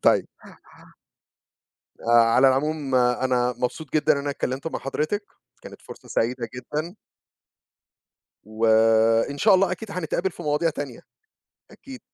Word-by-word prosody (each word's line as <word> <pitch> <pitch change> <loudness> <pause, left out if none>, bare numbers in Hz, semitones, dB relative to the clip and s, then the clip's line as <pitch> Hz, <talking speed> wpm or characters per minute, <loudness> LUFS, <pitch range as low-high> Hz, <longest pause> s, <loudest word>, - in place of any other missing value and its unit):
طيب. - - +3 1.7
آآ، 115 - -3 0.2
على 135 +1 +6
العموم، 140 0 -1
آآ، 125 0 +2
أنا 125 -1 +1
مبسوط 130 +4 -4
جدًا 155 0 +3
إن 145 - 0
أنا 140 0 -3
اتكلمت 135 +1 -4
مع - - -3
حضرتِك. 155 +9 -3 0.4
كانت - - -12
فرصة - - -13
سعيدة 120 +1 -1
جدًا. 155 +8 -5 1.5
وإن 115 +4 +2
شاء 210 -2 +5
الله، 185 -1 +3
أكيد 215 +3 -7
هنتقابل 180 +1 -2
في 175 - -11
مواضيع 150 +2 0
تانية، 145 -5 -7 0.7
أكيد. 265 -2 -12
140 Hz, 130 wpm, -24 LUFS, 125-165 Hz, 1.7 s, على